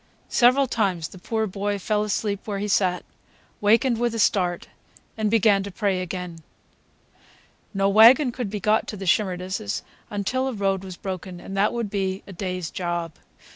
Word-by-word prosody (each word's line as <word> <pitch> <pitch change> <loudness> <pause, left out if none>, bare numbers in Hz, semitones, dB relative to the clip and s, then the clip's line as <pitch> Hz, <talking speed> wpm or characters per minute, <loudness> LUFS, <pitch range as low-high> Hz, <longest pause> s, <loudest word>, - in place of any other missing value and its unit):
Several 255 +3 +4
times 195 - -1
the 185 - -12
poor 220 +4 -1
boy 205 +1 -2
fell 210 +2 0
asleep 205 0 -2
where 205 -2 -2
he 205 +1 -2
sat, 185 -3 +1 0.6
wakened 230 +3 +3
with 240 -1 0
a - - -2
start, 180 -5 +1 0.5
and 215 -1 0
began 205 -2 +4
to 200 - -5
pray 195 -1 -1
again. 180 -2 -5 1.3
No 195 -1 +1
wagon 235 +7 +7
could 240 -3 -4
be 210 +1 -4
got 215 +1 +2
to 210 - -5
the 195 - -6
Shimerdas' 190 +2 -1 0.3
until 230 +6 -1
a 265 - -2
road 195 -2 -1
was 185 -2 -8
broken, 185 -1 -6
and 195 - -8
that 200 +2 +2
would 235 -4 -3
be 195 -2 -2
a 195 - -10
day's 180 -2 -4
job. 175 -2 -3
200 Hz, 175 wpm, -24 LUFS, 185-220 Hz, 1.3 s, wagon